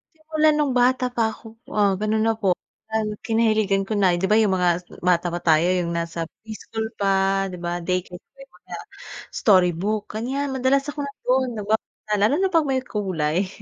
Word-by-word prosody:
Simula 310 0 0
nung 295 -3 +1
bata 255 +1 +3
pa 230 - +2
ako, 220 - -15 0.3
ah, 200 -1 +4
ganun 215 +1 +1
na 225 - +3
po 195 -3 +3 0.4
an 220 -1 0 0.2
kinahiligan 215 -4 +1
ko 215 - -2
na. 195 -3 +3
'Di 190 - 0
ba, 210 - +3
yung 215 -3 +4
mga 180 -1 +2 0.3
bata 175 -1 +1
pa 175 - -3
tayo, 160 -2 +3 0.2
yung 170 -1 -2
nasa 165 0 -3 0.2
pre-school 220 0 -6
pa, 195 0 +2
'di 185 - -7
ba, 175 0 -3
daycare 180 0 -3
pa - - -61
yong 270 - -22
mga - - -9 0.6
storybook, 190 +1 +2
ganyan. 265 +6 -2
Madalas 265 +1 +2
ako 295 - -10
nandu'n 260 -2 0
nagbab 215 +1 0 0.4
lalo 215 +8 +3
na 380 +2 +1
'pag 325 -4 +3
may 260 -1 0
kulay, 185 -5 -1
210 Hz, 180 wpm, -23 LUFS, 180-255 Hz, 0.6 s, ah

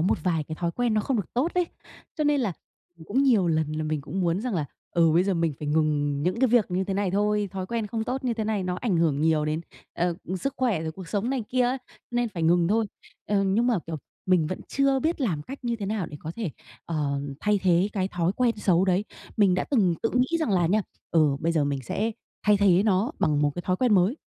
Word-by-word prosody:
một 175 - +2
vài 165 -4 +1
cái 155 - -6
thói 170 +1 -2
quen 240 +2 0
nó 215 - +3
không 250 +4 -1
được 200 - -4
tốt 275 +8 +1
ấy, 360 -1 +2 0.5
cho 305 - 0
nên 290 -2 +3
là, 215 -6 0 0.5
ừ, 160 - -12
cũng 260 +7 +2
nhiều 225 -10 +4
lần 155 -2 +1
là 155 - -2
mình 155 -1 -1
cũng 160 +7 -4
muốn 175 +1 +1
rằng 245 -1 -2
là, 155 -5 0 0.3
ừ, 165 -2 +3
bây 175 +3 +4
giờ 195 -1 +1
mình 165 -2 +1
phải 150 - -4
ngừng 145 -2 +1
những 185 +7 0
cái 260 - +4
việc 235 -3 +4
như 185 +2 0
thế 195 0 -2
này 200 -1 0
thôi, 210 +1 +1
thói 190 -1 -4
quen 230 0 -2
không 220 +1 -3
tốt 260 +3 -3
như 245 -2 +1
thế 220 -1 -2
này 210 -2 0
nó 180 0 -1
ảnh 215 -8 +1
hưởng 160 -4 +2
nhiều 155 -1 +2
đến, 155 +1 -1 0.3
ờ, 175 0 0
ừ, 185 - -3
sức 275 +9 -3
khỏe, 235 -11 +1
rồi 160 0 -3
cuộc 185 0 -10
sống 210 +4 -1
này 260 -5 -1
kia 255 0 +2
á, 250 +2 +1 0.3
nên 240 0 0
phải 175 -6 -5
ngừng 170 +1 +3
thôi. 220 +2 +2 0.4
Ờ, 200 -1 +2
nhưng 195 +5 +2
mà, 240 -5 +2
kiểu, 165 -1 -4 0.3
mình 180 -4 +3
vẫn 185 - -4
chưa 275 -1 +2
biết 320 +2 0
làm 170 - 0
cách 270 - -8
như 235 -1 0
thế 205 - -4
nào 205 -3 -1
để 150 - -8
có 160 - -5
thể, 220 -8 -2 0.4
ờ, 145 -4 -1 0.2
thay 210 -1 +2
thế 180 +1 +3
cái 190 -2 -1
thói 175 -1 0
quen 235 +1 +1
xấu 185 -3 +3
đấy. 190 +1 +1 0.3
Mình 200 -4 +4
đã 185 - 0
từng 200 -11 +3
tự 225 - +1
nghĩ 255 +7 +2
rằng 315 -8 0
là 180 -3 +3
nha, 205 +5 +2 0.3
ừ, 155 -4 +3
bây 165 +1 +1
giờ 155 -3 +2
mình 140 -1 -2
sẽ 215 - -1 0.3
thay 210 0 +4
thế 195 -2 +4
nó 210 +5 +1
bằng 150 -6 +2
một 145 - +3
cái 175 - -4
thói 185 +1 0
quen 245 0 +3
mới. 195 +7 +3
190 Hz, 265 wpm, -26 LUFS, 165-230 Hz, 0.5 s, nhiều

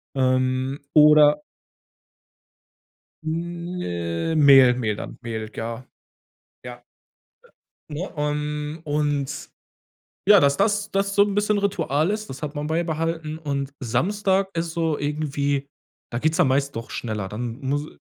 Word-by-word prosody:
Ähm, 130 +1 +1
oder 150 -1 +6 1.8
Hm, 165 - -3
Mehl 135 -4 +7
Mehl 110 -4 -1
dann - - -8
Mehl, 110 -2 -5
ja. 115 +2 -5 0.8
Ja. 120 -1 -9 1.1
Ne? 155 +6 -4
Ähm, 150 +1 -2
und 145 -2 -2 0.8
ja, 205 -1 +9
dass 140 -1 +3
das 205 +1 +1
das 195 0 0
so 200 - +6
'n 205 -1 -3
bisschen 205 0 +1
Ritual 170 -5 0
ist, 215 0 -3
das 135 - -8
hat 150 0 -4
man 145 0 -3
beibehalten. 160 -1 -2
Und 140 -3 -3
Samstag 190 - +1
ist 165 0 -2
so 165 -3 0
irgendwie 145 -1 -1 0.4
da 120 - -1
geht's 155 +5 +1
dann 175 -6 +4
meist 140 0 0
doch 115 0 -6
schneller. 110 -4 -4
Dann 115 +3 -5
muss 145 +2 -2
150 Hz, 125 wpm, -23 LUFS, 130-165 Hz, 1.8 s, ja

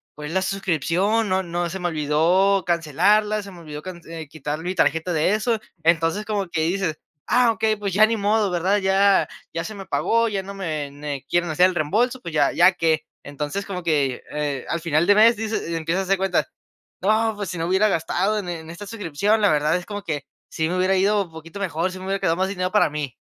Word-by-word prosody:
Fue 150 0 -7
la 190 +3 0
suscripción 195 - 0
no 190 0 +2
no 175 0 -2
se 190 +3 -5
me 175 - -1
olvidó 170 +6 +2
cancelarla, 195 +6 +2
se 200 - -10
me 180 - -12
olvidó 150 -2 -8
cance 170 -3 -8
eh 155 - -9
quitar 150 +1 -5
mi 180 +1 -2
tarjeta 165 +1 +1
de 160 +5 +2
eso. 220 +1 0 0.2
Entonces, 165 +5 +2
como 200 -4 -2
que 160 - -1
dices: 170 -1 -1 0.3
"Ah, 245 -1 +4
ok, 225 0 -8 0.2
pues 200 -2 -3
ya 215 +3 +6
ni 225 0 -1
modo, 210 0 +2
¿verdad? 180 +4 +1
Ya 195 0 +3 0.3
ya 165 0 -2
se 215 - -7
me 195 -1 -8
pagó 230 0 +1
ya 200 -2 -2
no 200 +1 -8
me 155 -7 -3
ne 145 -1 -6
quieren 175 -1 +1
hacer 180 +4 +5
el 185 - -5
reembolso, 225 - 0
pues 170 -3 -7
ya, 145 -2 +3
¿ya 175 +2 +6
qué? 165 -2 0 0.2
Entonces, 150 +8 -4
como 180 -2 -5
que, 145 -6 0
eh, 145 -3 -3
al 170 - -1
final 160 0 +1
de 205 - +6
mes 230 +2 +6
dices 220 -5 -3
y 170 - -2
empiezas 165 +3 -1
a - - -2
hacer 195 +1 +2
cuentas, 190 -1 0 0.5
¡no!, 220 +3 +2
pues 205 -3 -5
si 180 - -5
no 165 - -2
hubiera 190 +4 +3
gastado 190 +4 0
en 195 - -6
en 160 -2 -6
esta 175 +5 -8
suscripción, 205 +1 0
la 205 - +4
verdad 150 +1 +2
es 180 -1 -3
como 205 -1 -6
que, 150 -4 -4 0.2
sí 160 0 -1
me 180 - -1
hubiera 185 +1 +2
ido 200 +2 +2
un 165 - -19
poquito 160 +4 -10
mejor 175 -1 -1
si 185 - -8
me 185 - -8
hubiera 195 +1 -1
quedado 165 - +1
más 190 +1 0
dinero 185 -2 -2
para 210 -6 +4
mí. 150 -5 -4
180 Hz, 235 wpm, -23 LUFS, 160-200 Hz, 0.5 s, ya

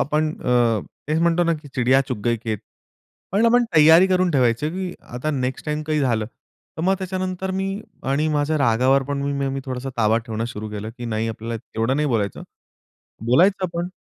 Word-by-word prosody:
आपण 155 +2 +1
अ, 120 -3 +2 0.3
तेच 155 +1 +1
म्हणतो 170 +1 +3
ना 170 - +2
की 145 - -12
"चिडिया 130 +1 +4
चुग 125 -5 -2
गई 120 -1 +2
खेत." 110 -3 -2 0.7
पण 215 +4 +3
आपण 240 +1 +4
तयारी 160 +4 +8
करून 185 -1 +2
ठेवायची 130 +1 +2
की 185 +1 -4 0.2
आता 155 +5 -2
नेक्स्ट 130 -1 -3
टाईम 150 0 -1
काही 155 -1 +1
झालं, 115 -5 +1 0.5
तर 160 - -3
मग 190 +3 +3
त्याच्यानंतर 185 0 -3
मी 195 +2 -2 0.3
आणि 150 +3 +1
माझ्या 150 +1 +1
रागावर 130 +2 +3
पण 140 -1 -2
मग 140 -1 -1
मी 135 - -3
थोडासा 130 0 -4
ताबा 110 0 +3
ठेवणं 115 -1 -4
सुरू 105 +1 -6
केलं, 105 +1 -5
की 120 - -6
नाही 115 -1 -1
आपल्याला 115 +1 -4
तेवढं 115 +3 -2
नाही 150 0 +1
बोलायचं. 105 -6 -1 0.8
बोलायचं 185 +10 +4
पण 175 +1 -2
140 Hz, 190 wpm, -22 LUFS, 115-170 Hz, 0.8 s, तयारी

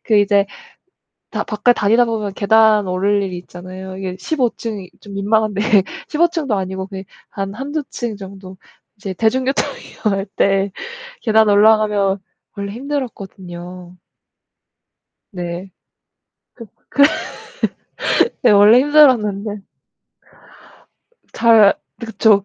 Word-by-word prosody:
그 215 - +2
이제 200 -1 +3 0.8
다 - - -2
밖에 210 +2 +2
다니다 230 +2 +3
보면 215 -4 -3
계단 215 0 +4
오를 200 +3 +1
일이 185 -2 -4
있잖아요. 185 +1 -9
이게 185 -1 -5
15 260 -3 0
층이 205 -5 -6
좀 200 -1 -11
민망한데 205 0 0 0.5
15 340 +3 +2
층도 310 -9 -2
아니고 190 0 -4
그냥 190 -1 -8 0.3
한 195 0 -5
1-2 285 +6 -4
층 235 -4 -4
정도. 190 -1 -11 0.4
이제 200 -2 -6
대중교통 255 +7 +1 0.4
이용할 195 -1 +1
때 195 0 +2 0.5
계단 220 -2 +3
올라가면 205 -1 +3 0.4
원래 200 -1 -5
힘들었거든요. 185 -9 -7 1.4
네. 180 0 -6 1.2
그 280 - +1
그 290 - +3 1.2
네. - - +5
원래 210 +4 +7
힘들었는데 225 -9 +3 1.7
잘 225 -4 +5 0.3
네 230 - -6
그쵸. 215 -3 +3
205 Hz, 215 characters per minute, -18 LUFS, 195-225 Hz, 1.7 s, 원래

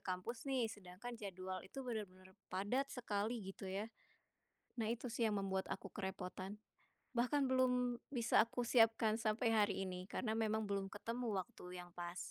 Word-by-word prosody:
kampus 210 +8 -3
nih, 245 -5 +2
sedangkan 205 +4 -8
jadwal 185 -1 -4
itu 255 +9 -7
bener-bener 190 -6 -5 0.2
padat 205 +9 +1
sekali, 220 -2 -1
gitu 195 - -7
ya. 205 +4 -2 0.8
Nah, 225 -2 0
itu 240 +2 -2
sih 230 -1 +2
yang 205 - +1
membuat 190 -1 -1
aku - - -3
kerepotan. 190 0 -4 0.6
Bahkan 265 +4 +3
belum 250 -1 +3 0.2
bisa 240 -4 +5
aku 235 +1 -2
siapkan 225 -2 +5
sampai 225 +1 +2
hari 205 -2 +3
ini 180 0 -4
karena 220 -3 0
memang 220 -1 +1
belum 195 -1 -1
ketemu 230 -1 -1
waktu 180 0 -7
yang 175 -1 -10
pas. 175 0 -4
215 Hz, 155 wpm, -40 LUFS, 190-240 Hz, 0.8 s, bisa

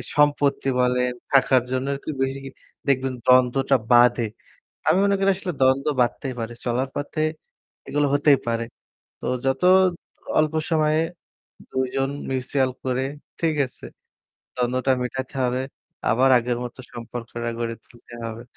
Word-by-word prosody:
সম্পত্তি 145 -2 +2
বলেন, 125 0 +2 0.2
টাকার 130 -2 +4
জন্য 130 +1 -1
আরকি 145 +3 -5
বেশি 135 +1 -1 0.5
দেখবেন 135 -1 +1
দ্বন্দ্বটা 130 +2 +4 0.2
বাঁধে। 120 -1 +5 0.6
আমি - - +5
মনে 200 0 +3
করি 195 0 +3
আসলে 185 -2 -4
দ্বন্দ্ব 130 +2 +3
বাঁধতেই 125 +2 -1
পারে, 115 +1 -4
চলার 125 +2 0
পথে 155 +2 -3 0.7
এগুলো 145 0 +1
হতেই 145 -1 +5
পারে। 115 0 0 0.6
তো - - -6 0.2
যত 135 +5 0 0.8
অল্প 155 0 +3 0.2
সময়ে 155 -1 +3 0.7
২ 130 0 0
জন 135 0 +1 0.2
mutual 130 0 0
করে, 130 0 0 0.4
ঠিক 160 -2 +1
আছে? 125 - -16 0.7
দ্বন্দ্বটা 125 +2 +1
মিটাইতে 130 +2 -5
হবে, 125 +1 0 0.5
আবার 130 +3 +4
আগের 120 0 -1
মত 120 - -7 0.2
সম্পর্কটা 120 0 -5
গড়ে 115 -1 -2
তুলতে 120 0 -15
হবে। 115 +1 -7
130 Hz, 135 wpm, -23 LUFS, 120-140 Hz, 0.8 s, বাঁধে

